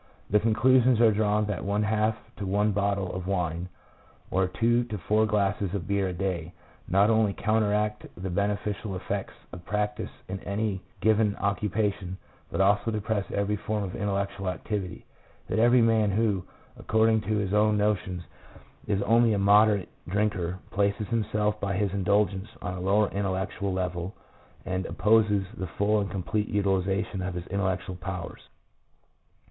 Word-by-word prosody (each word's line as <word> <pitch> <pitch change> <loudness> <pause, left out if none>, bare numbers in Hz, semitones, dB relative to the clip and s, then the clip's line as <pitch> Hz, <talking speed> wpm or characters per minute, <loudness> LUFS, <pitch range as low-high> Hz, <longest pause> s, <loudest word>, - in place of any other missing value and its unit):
The 105 - +5
conclusions 125 +2 +4
are 115 -2 +6
drawn 105 0 +1
that 105 -3 -3
one 100 +2 0
half 110 +1 +1 0.2
to 100 - -4
one 105 +2 +2
bottle 100 -2 0
of 90 0 -5
wine, 90 -2 -1 0.6
or 95 0 +2
two 120 +6 +2
to 110 -3 -5
four 105 +5 +2
glasses 100 -2 0
of 90 -4 -4
beer 100 -1 +1
a 90 - -3
day, 90 -2 -3 0.3
not 100 +4 +4
only 110 -2 +3
counteract 105 0 0
the 95 +1 -4
beneficial 100 +1 -2
effects 90 - -4 0.2
of 90 - -8
'practice' 105 +2 -2 0.2
in 95 +1 -4
any 100 -1 -2 0.2
given 110 -1 +3
occu 100 +1 -1
pation, 100 -2 -1 0.4
but - - -3
also 100 +3 +3
depress 105 -2 -1
every 100 +1 0
form 105 0 -2
of 90 -2 -5
intellectual 100 -1 -2
activity: 90 0 -4 0.4
that - - -1
every 120 +1 +5
man 110 -2 +3
who, 100 -2 +1 0.4
according 110 0 +3
to 105 +1 -1
his 100 -1 -1
own 105 0 +3
notions, 95 -4 0 0.6
is 100 -1 +1
only 115 0 +4
a - - +1
moderate 100 0 +4 0.2
drinker, 95 -2 -1
places 100 +1 0
himself 105 -2 0
by 100 -1 -1
his 100 0 0
indulgence 100 0 +1
on 90 - -3
a 90 - -5
lower 100 +3 +3
intellectual 95 0 -2
level, 90 0 -3 0.5
and 95 0 -2
opposes 105 -2 +3
the 95 - -3
full 105 +4 +1
and 100 -1 -2
complete 105 +3 -2
utilization 95 -1 0
of 90 -1 -3
his 90 -1 -5
intellectual 95 -1 -1
powers." 90 -1 -6
100 Hz, 155 wpm, -27 LUFS, 95-105 Hz, 0.6 s, are